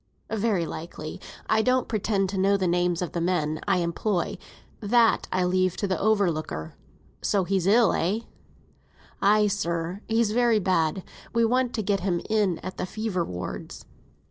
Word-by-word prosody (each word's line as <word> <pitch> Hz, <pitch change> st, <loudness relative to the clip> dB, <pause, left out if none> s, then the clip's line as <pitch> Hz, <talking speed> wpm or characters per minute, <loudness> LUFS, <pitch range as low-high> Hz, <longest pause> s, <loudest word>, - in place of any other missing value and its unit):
"Very 210 Hz, -5 st, +1 dB
likely; 160 Hz, -1 st, -7 dB, 0.3 s
I 220 Hz, -, +3 dB
don't 255 Hz, +2 st, +2 dB
pretend 205 Hz, -3 st, 0 dB
to 195 Hz, -, -3 dB
know 200 Hz, +1 st, +3 dB
the 190 Hz, -, -1 dB
names 175 Hz, 0 st, +1 dB
of 175 Hz, -, -4 dB
the 170 Hz, -, -2 dB
men 155 Hz, -3 st, 0 dB
I -, -, +3 dB
employ; 175 Hz, +2 st, -1 dB, 0.4 s
that 230 Hz, +2 st, +3 dB
I 185 Hz, -, +1 dB
leave 185 Hz, 0 st, +1 dB
to -, -, -1 dB
the 185 Hz, -3 st, -1 dB
overlooker. 170 Hz, -, 0 dB, 0.5 s
So 200 Hz, -2 st, +1 dB
he's 190 Hz, 0 st, 0 dB
ill, 225 Hz, +3 st, +5 dB
eh?" 195 Hz, +7 st, 0 dB, 1.0 s
"Ay, 210 Hz, +1 st, +4 dB
sir, 175 Hz, -2 st, -2 dB
he's 225 Hz, -1 st, +2 dB
very 235 Hz, 0 st, +3 dB
bad; 185 Hz, -2 st, +1 dB, 0.3 s
we 230 Hz, 0 st, +3 dB
want 250 Hz, +1 st, +1 dB
to 220 Hz, -, -1 dB
get 200 Hz, 0 st, +1 dB
him 180 Hz, -2 st, 0 dB
in 205 Hz, -6 st, +2 dB
at 185 Hz, -, -6 dB
the -, -, -3 dB
fever 215 Hz, -4 st, -2 dB
wards. 90 Hz, -, -6 dB
195 Hz, 165 wpm, -26 LUFS, 175-215 Hz, 1.0 s, ill